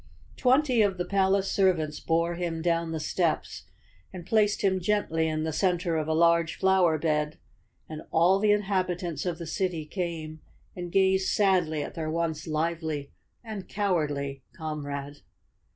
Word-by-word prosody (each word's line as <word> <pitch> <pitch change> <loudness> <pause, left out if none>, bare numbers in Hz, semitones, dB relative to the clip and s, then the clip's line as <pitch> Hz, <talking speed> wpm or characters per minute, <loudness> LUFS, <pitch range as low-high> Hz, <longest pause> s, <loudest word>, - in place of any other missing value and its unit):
Twenty 255 -2 +3
of 200 -3 +2
the 180 - -2
palace 195 0 +1
servants 175 -6 +1
bore 170 +1 0
him 170 -2 -3
down 170 -1 0
the 160 - -3
steps 165 +1 -1 0.5
and 180 -2 -9
placed 210 0 +2
him 190 -1 +2
gently 175 -4 0
in 155 0 -1
the 160 0 -2
center 175 0 +1
of 155 -1 -1
a 160 - +1
large 170 0 +3
flower 190 -4 +3
bed, 150 -1 -1 0.5
and 155 0 -7
all 175 +4 +4
the 210 0 +3
inhabitants 185 -5 -1
of 170 -2 -2
the 170 - -6
city 165 -1 -2
came 160 -3 -5 0.3
and 175 -1 -6
gazed 190 0 +3
sadly 180 -7 +2
at - - -7
their 160 -1 -4
once 165 0 -2
lively 155 -2 -2 0.3
and 215 -4 -7
cowardly 145 -9 -1 0.2
comrade. 145 -2 -5
170 Hz, 150 wpm, -27 LUFS, 155-190 Hz, 0.5 s, all